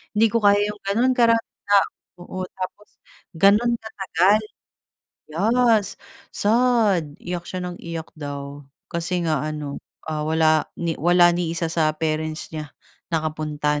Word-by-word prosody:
Hindi 220 +2 +5
ko 230 - +2
kaya 205 0 +6
'yong 210 - -14
gano'n 235 +6 +2
karaming 230 -1 +2
tao. 200 -1 +4 0.3
Oo, 185 +1 -6
tapos 190 +2 -7 0.5
gano'n 205 +7 +4
katagal. 205 -2 +1 0.8
Yes, 220 +5 +2 0.3
sad. 210 -9 +2
Iyak 175 0 -5
siya 185 - -4
ng 180 -1 -5
iyak 165 -1 -6
daw. 145 -1 -6 0.3
Kasi 170 +1 -1
nga 155 -4 +1
ano, 150 -2 -4 0.3
ah, 155 -1 -2
wala 155 0 +2
ni 170 -1 -2
wala 175 +2 +5
ni 175 -1 -1
isa 165 0 -1
sa 160 -2 +2
parents 155 0 -3
niya 155 -2 -6 0.4
nakapunta, 155 -2 -1
170 Hz, 135 wpm, -23 LUFS, 155-205 Hz, 0.8 s, kaya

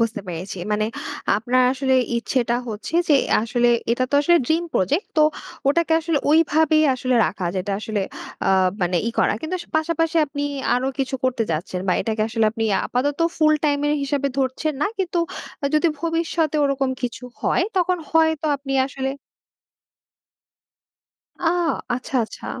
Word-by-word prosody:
বুঝতে 225 -2 0
পেরেছি। 180 +2 -5
মানে 215 +1 +1 0.5
আপনার 245 +4 +2
আসলে 265 0 +1 0.2
ইচ্ছেটা 235 0 0
হচ্ছে 220 +8 -6
যে, 300 - +6 0.3
আসলে 240 +1 +1 0.2
এটা 255 +2 +1
তো - - -1
আসলে 345 +4 +4
dream 325 +4 +1
project 290 - +1
তো 310 - +6 0.5
ওটাকে 325 +3 +2
আসলে 325 -2 0
ওইভাবেই 315 0 +4
আসলে 255 0 -1
রাখা, 185 -3 -3
যেটা 195 +2 -2
আসলে 215 -1 -2 0.5
আ - - +4 0.3
মানে 180 0 +1
ই - - -1
করা। - - +3
কিন্তু 315 +4 -4
আস 345 - -8
পাশাপাশি 330 +1 0
আপনি 285 0 -5 0.3
আরো 250 +1 0
কিছু 270 0 -1
করতে 250 -3 +1
যাচ্ছেন, 175 +3 -3
বা - - +4
এটাকে 220 -1 -1
আসলে 225 0 +1
আপনি 225 0 -2 0.2
আপাতত 275 +3 -1 0.2
ফুল 310 -1 +4
টাইম 290 -1 +2
এর 295 - +2
হিসাবে 280 0 -1
ধরছেন 270 +4 -1
না। - - +3
কিন্তু 360 -2 -1 0.6
যদি 305 +3 +4
ভবিষ্যতে 330 -2 0
ওরকম 275 -1 0
কিছু 240 0 -4 0.2
হয়, - - +2
তখন 365 0 +2
হয়তো 320 -1 +2
আপনি 275 0 -6
আসলে 270 0 -3 2.3
আ 350 - -1 0.5
আচ্ছা, 255 +2 -4
আচ্ছা। - - -10
275 Hz, 155 wpm, -22 LUFS, 230-315 Hz, 2.3 s, যে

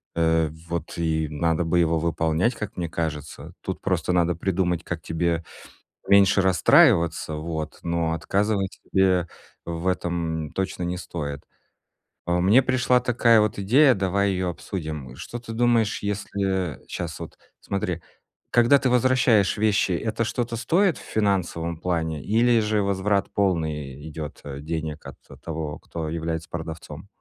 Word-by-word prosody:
э, 80 -1 +2 0.2
вот 85 -2 -4
и 80 -2 0
надо 80 +3 0
бы 85 +1 +2
его 85 -1 +2
выполнять, 80 +7 +1
как 105 -4 -6
мне 85 -2 -2
кажется. 80 -3 -5
Тут - - -5
просто - - 0
надо 85 -1 +2
придумать, 90 -1 0
как 85 -3 -5
тебе 85 +1 -1 0.6
меньше 100 0 +5
расстраиваться, 95 - +4
вот, 80 -1 -5
но 85 -1 0
отказывать 95 +4 -1
себе 95 -2 +2 0.4
в 85 +1 -5
этом 85 -4 -1
точно 95 -2 -3
не 90 +1 -2
стоит. 75 -5 -5 0.9
Э, 85 0 +2
мне 100 +9 +5
пришла 125 -1 +3
такая 120 -2 +4
вот 105 -2 0
идея, 130 +8 +5
давай 100 +1 +1
её 90 -1 -1
обсудим. 75 -7 -6
Что 120 - -7
ты 115 -1 -8
думаешь, 115 -3 +2
если 95 -3 -2
щас 85 -2 -5
вот, - - -9 0.2
смотри: 90 -3 -3 0.5
когда 120 +4 +5
ты 130 -1 +1
возвращаешь 125 -5 +3
вещи, 105 -2 +2
это 110 +6 -1
что-то 120 +1 -2
стоит 170 - +2
в - - -11
финансовом 90 -5 0
плане 80 -4 -2
или 115 - +3
же 105 0 +1
возврат 100 0 0
полный 80 -8 0
и 75 +3 -9
идет, 75 -1 -7
э, 70 -1 -7
денег 80 0 -4
от - - -9 0.2
того, 80 -2 -5
кто 80 -2 -5
является 80 0 -3
продавцом? 80 0 -7
90 Hz, 145 wpm, -24 LUFS, 80-105 Hz, 0.9 s, меньше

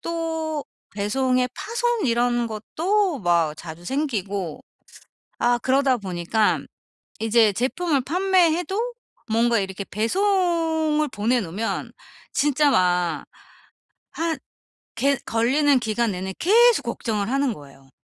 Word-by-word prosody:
또 320 -2 -3 0.3
배송에 250 +5 +1
파손 470 - -1
이런 240 0 +1
것도 330 - -1
막 170 -4 +1
자주 170 +1 -9
생기고 200 - -2 0.8
아 240 0 +3
그러다 265 0 +2
보니까 195 +2 0 0.6
이제 225 -1 +4
제품을 270 - 0
판매해도 370 - +1 0.4
뭔가 230 +1 +2
이렇게 190 0 -3
배송을 320 - +1
보내 235 +2 0
놓으면 200 +5 -3 0.4
진짜 290 +1 +2
막 180 - +1 0.9
한 330 -1 -2 0.6
게 275 +4 +2
걸리는 265 +4 +3
기간 220 -1 0
내내 190 +1 -4
계속 450 -2 +5
걱정을 220 -3 -2
하는 275 -2 +1
거예요. 140 -4 -15
250 Hz, 225 characters per minute, -23 LUFS, 205-320 Hz, 0.9 s, 계속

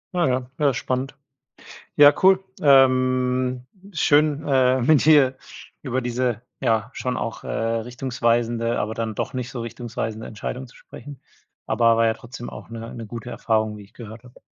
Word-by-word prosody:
Ja, 175 -2 +2
ja. 125 -1 -1
Ja, 145 -3 +3
spannend. 130 +2 -3 0.8
Ja, 145 0 +8
cool. 190 0 +5 0.2
Ähm, 130 -2 +3 0.3
schön, 150 -1 +2
äh, 130 -2 +3
mit 140 +3 +4
dir 140 -4 +5 0.4
über 130 -2 -2
diese, 120 -2 -2 0.2
ja, 115 -3 0
schon 125 0 -3
auch, 115 - -5
äh, - - -7
richtungsweisende, 115 0 -1
aber 110 +1 -2
dann 110 -1 -4
doch - - -3
nicht 125 -1 -4
so 120 - -6
richtungsweisende 115 -1 -5
Entscheidung 125 +4 -6
zu - - -20
sprechen. 135 +1 -12 0.5
Aber 115 -1 +3
war 115 0 +3
ja 110 - +2
trotzdem 120 0 -9
auch - - -10
'ne 115 0 -8
'ne 115 - -7
gute 115 +2 -8
Erfahrung, 110 -2 -1
wie 105 - -11
ich 100 - -21
gehört 115 0 -11
habe. 125 - -17
125 Hz, 165 wpm, -23 LUFS, 115-130 Hz, 0.8 s, Ja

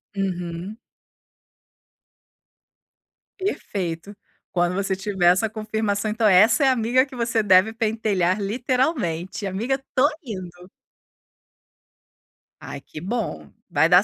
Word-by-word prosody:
Uhum. 180 +1 -4 2.6
Perfeito. 195 - -3 0.4
Quando 175 0 +1
você 195 0 0
tiver 190 -3 0
essa 210 +4 +1
confirmação, 215 -1 -2
então 220 0 +2
essa 210 - +6
é - - +5
a - - +5
amiga 250 +3 +2
que 265 -2 -12
você 230 -2 +1
deve 195 +1 +5
pentelhar 215 -4 0
literalmente: 215 - -1
"Amiga, 220 +8 -1
estou 270 +1 +1
indo". 180 -5 -8 1.9
Ai, 145 -1 -7
que 155 - -10
bom. 180 - -4 0.2
Vai - - +3
dar - - +6
205 Hz, 105 wpm, -23 LUFS, 180-230 Hz, 2.6 s, essa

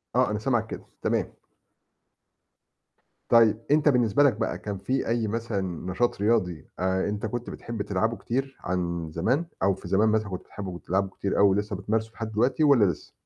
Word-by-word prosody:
آه، 125 -4 +3
أنا 105 - -1
سامعك 120 -2 0
كده - - -7 0.2
تمام. - - 0 2.0
طيب 115 -1 +5
أنت 150 0 +5
بالنسبة 120 0 +3
لك 140 -5 +5
بقى، 105 - -2
كان 100 -2 -5
في 130 +8 -1
أي 115 -1 0
مثلًا 115 -1 -2 0.3
نشاط 115 +1 0
رياضي، 95 - +1
آآ 95 +1 +1
أنت 105 +1 -3
كنت 120 +2 -4
بتحب 115 -3 -6
تلعبه 110 +4 0
كتير 135 +3 -3
عن 85 -3 -2
زمان، 120 - 0 0.2
أو 95 - +4
في 95 - -10
زمان 100 +4 +3
مثلًا 110 -1 +1
كنت 90 -1 -5
بتحبه، 100 -2 -7
وبتلعبه 95 +3 -1
كتير 100 +1 -3
أوي، 100 -1 +7
ولسه 105 +1 0
بتمارسه 110 +3 -2
لحد 110 -1 -5
دلوقتي 125 +8 +2
والّا 135 -8 +6
لسه؟ 90 -5 -3
105 Hz, 175 wpm, -26 LUFS, 95-115 Hz, 2.0 s, أوي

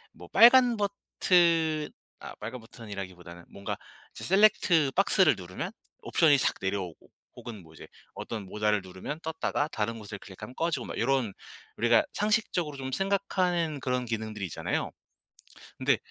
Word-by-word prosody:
뭐 - - -12
빨간 245 -1 +7
버튼 170 -6 +2 0.3
아 - - -9
빨간 115 +4 -6
버튼이라기보다는 95 -7 -9
뭔가 100 0 -5 0.4
이제 - - -10
셀렉트 190 -7 +4
박스를 195 0 +4
누르면 90 0 -6 0.3
옵션이 150 -3 +4
삭 - - +2
내려오고 95 -4 -4 0.3
혹은 110 -6 -9
뭐 80 0 -17
이제 - - -12 0.3
어떤 110 -4 -6
모달을 105 +1 0
누르면 95 - -7
떴다가 155 -2 -1
다른 115 -1 -2
곳을 100 -2 -8
클릭하면 100 +6 -10
꺼지고 165 +4 -1
막 - - -6
요런 120 -4 +1 0.4
우리가 120 +1 +4
상식적으로 205 -8 0
좀 130 0 -5
생각하는 180 -4 0
그런 125 -1 -1
기능들이 110 -3 -4
있잖아요. 85 - -3 0.9
근데 - - +3
130 Hz, 345 characters per minute, -28 LUFS, 105-170 Hz, 0.9 s, 빨간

